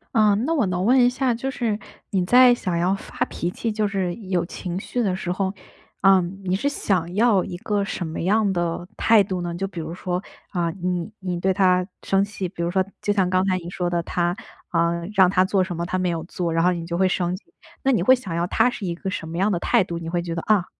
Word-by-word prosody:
嗯， 215 0 +4
那 330 +1 +1
我 235 - +2
能 180 0 -1
问 255 +3 +5
一 245 - +6
下， 250 -1 0
就 270 +3 -3
是 225 -5 -1 0.3
你 185 -3 0
在 245 +4 +7
想 180 -6 -3
要 185 +3 +2
发 - - -11
脾 175 +1 -3
气， 225 +3 -3
就 210 -1 0
是 190 -3 -2
有 185 -5 -1
情 180 +1 -5
绪 245 +3 -2
的 185 -3 0
时 180 -1 -3
候， 190 +1 -1 0.5
嗯， 195 0 +3
你 185 0 0
是 270 +8 -1
想 180 - -1
要 210 -3 +3
一 175 - -6
个 205 +1 -1
什 175 -3 -4
么 160 - -5
样 205 +2 +2
的 175 0 -2
态 220 -3 +5
度 185 -2 -3
呢？ 175 -1 -3
就 195 +3 -3
比 180 -3 -8
如 160 +1 -5
说， 180 0 -3 0.3
啊， 170 -3 -1
你 180 +2 -3
你 180 -2 -3
对 190 +1 +2
他 180 -1 +3 0.2
生 195 0 +2
气 200 -3 -5
比 170 -2 -5
如 170 - -1
说 190 0 +2 0.2
就 205 - +2
像 190 -3 +2
刚 185 +1 +2
才 185 -1 +1
你 170 0 -8
说 180 -1 -2
的， 175 -1 0
他， 175 +1 -1 0.3
啊， 170 -1 +2 0.2
让 190 -3 +6
他 185 0 +3
做 190 -1 +2
什 175 -2 -5
么 170 - -2
他 185 +1 -2
没 180 -1 0
有 165 -1 -2
做， 175 -1 -3
然 165 +1 +2
后 180 - +4
你 170 -1 -4
就 170 - -2
会 190 +1 +3
生 180 -1 0
气。 185 - -12 0.4
那 270 - +3
你 225 - +2
会 260 +8 +6
想 200 -9 -7
要 170 +1 0
他 245 - +3
是 195 - -5
一 170 - -2
个 190 +2 -4
什 160 -3 -5
么 165 - -5
样 200 +3 +2
的 175 - 0
态 235 0 +3
度？ 170 -2 -5
你 165 0 -6
会 175 0 -1
觉 170 -1 -4
得： 165 - -3
“啊， 190 -4 +4
185 Hz, 280 characters per minute, -23 LUFS, 175-200 Hz, 0.5 s, 在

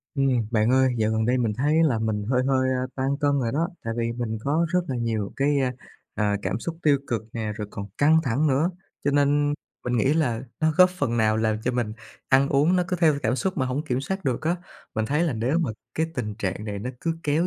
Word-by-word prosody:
Ừm, 130 -5 +2
bạn 110 0 +2
ơi, 130 -1 +3
dạo 110 0 +2
gần 110 0 +1
đây 125 +1 +2
mình 115 -3 +1
thấy 150 +5 +3
là 140 -8 +2
mình 110 -2 -1
hơi 125 -1 +3
hơi 130 -1 +2 0.3
tăng 135 +1 0
cân 145 - +3
rồi 115 -3 -1
đó, 165 +4 0 0.2
tại 115 0 -2
vì 115 0 0
mình 115 -2 -3
có 155 +7 +1
rất 180 +2 +2
là 130 - -2
nhiều 115 -4 -2
cái, 145 +1 +2 0.6
à, 105 -1 +1
cảm 95 +2 -1
xúc 165 +7 -5
tiêu 145 -2 +4
cực 115 -3 -1
nè, 110 -2 -3
rồi 105 - -4
còn 100 - -6
căng 155 +3 +5
thẳng 135 +3 +1
nữa. 150 +5 +2 0.3
Cho 145 - +3
nên 145 +1 +2 0.3
mình 125 0 0
nghĩ 130 +6 +3
là 125 -8 +1 0.2
nó 160 0 +3
góp 185 0 +7
phần 145 -10 -1
nào 110 -1 +3
làm 110 -1 +1
cho 125 - +2
mình 120 -3 -1 0.4
ăn 135 +1 +4
uống 150 +7 +3
nó 180 - +3
cứ 180 - 0
theo 160 -3 +5
cảm 115 +4 +1
xúc 190 +5 -1
mà 130 - +1
hổng 130 +3 -2
kiểm 130 -3 -1
soát 190 +7 -4
được 130 -4 -1
á. 165 +3 +1 0.4
Mình 110 - 0
thấy 150 +7 +1
là 165 -6 +1
nếu 120 +8 0
mà 160 -8 0 0.2
cái 160 - +1
tình 105 -8 -3
trạng 100 0 -3
này 105 -2 -4
nó 120 +5 -4
cứ 165 -1 -1
kéo 155 +3 +1
130 Hz, 245 wpm, -25 LUFS, 115-150 Hz, 0.6 s, góp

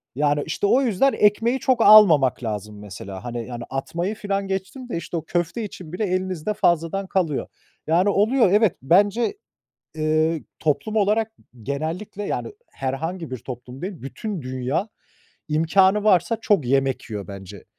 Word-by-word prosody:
Yani, 145 +1 +1
işte, 200 - -1
o 260 +6 +4
yüzden 265 +3 +2
ekmeği 225 +5 +2
çok 255 -3 +1
almamak 165 - +7
lazım 105 -1 -5
mesela. 95 0 -8
Hani, 120 -1 -5
yani 120 -1 -6
atmayı 170 +9 -3
filan 200 -2 -2
geçtim 195 +7 -5
de, 170 - -2
işte, 170 0 -5
o 160 - -4
köfte 175 +6 -2
için 180 -5 -9
bile 210 +3 -1
elinizde 185 +1 -2
fazladan 175 0 +1
kalıyor. 165 -8 -1 0.4
Yani 175 +5 +3
oluyor, 215 +1 +3
evet, 210 -2 +4
bence, 205 - +2 0.6
eee, 155 +1 0
toplum 155 +8 -1
olarak 215 +2 +2 0.3
genellikle 160 - -4
yani - - -3 0.2
herhangi 160 +5 -4
bir 130 - -4
toplum 125 +3 -9
değil, 190 +1 -4
bütün 185 - -5
dünya 130 - -2 0.6
imkânı 190 +7 +3
varsa 190 +2 +3
çok 195 - +2
yemek 135 -2 0
yiyor 105 -1 -5
bence. 100 0 -10
175 Hz, 150 wpm, -23 LUFS, 135-205 Hz, 0.6 s, almamak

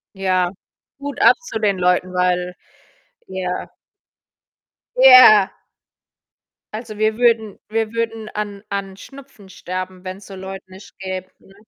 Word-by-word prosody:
Ja, 185 -2 0 0.5
Hut 285 0 -6
ab - - +6
zu 350 - -5
den 205 -3 0
Leuten, 180 0 +1
weil 180 0 0 0.7
ja. 185 -1 -4 1.3
Ja. 255 -6 +8 1.2
Also, 215 -1 -7
wir 215 0 +1
würden 225 -4 +1
wir 225 0 -1
würden 225 -1 -3
an 205 -1 -6
an 195 -1 -4
Schnupfen 265 -7 -14
sterben, 185 0 -7
wenn's 185 +1 -8
so 195 - -10
Leute 190 0 -8
nicht 185 +1 -15
gäbe, 185 -1 -6
ne? 195 - -21
195 Hz, 125 wpm, -20 LUFS, 185-220 Hz, 1.3 s, Ja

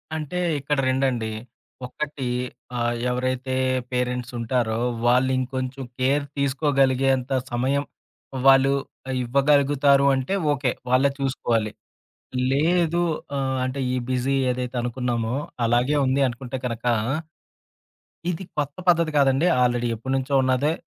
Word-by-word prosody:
అంటే, 155 +3 -4 0.2
ఇక్కడ 145 +2 -1
రెండండి. 130 -3 0 0.6
1 145 +1 -5 0.5
ఆహ్, 120 0 0
ఎవరైతే 130 +1 -2 0.4
పేరెంట్సూంటారో, 125 -2 -1 0.3
వాళ్ళు 125 +2 +4
ఇంకొంచెం 130 +1 -3 0.2
కేర్ 140 +3 +2
తీసుకోగలిగేంత 135 -2 +1 0.2
సమయం, 130 +4 0 0.6
వాళ్ళు 135 0 +6 0.5
ఇవ్వగలుగుతారు 140 +1 +3
అంటే, 130 +7 -2 0.2
ఓకే! 135 -3 0 0.2
వాళ్ళే 135 +2 +4
చూసుకోవాలి. 120 -5 0 0.8
లేదు. 170 +4 +2 0.4
ఆహ్, 130 -1 -1
అంటే, 130 +2 -3
ఈ - - +1 0.2
బిజీ 130 +2 +1 0.2
ఏదైతే 125 0 -4
అనుకున్నామో, 120 -1 -2 0.3
అలాగే 120 +5 +2
ఉంది 130 +2 +1
అనుకుంటే 125 +1 -5
కనక, 115 -1 -4 1.5
ఇది 180 +2 -4
కొత్త 145 -1 -2
పద్ధతి 170 -3 +4
కాదండి, 135 +3 +3 0.2
ఆల్రెడీ 120 -1 +1
ఎప్పటినుంచో 130 +4 -2
ఉన్నదే, 130 +4 +2
130 Hz, 105 wpm, -24 LUFS, 125-140 Hz, 1.5 s, వాళ్ళు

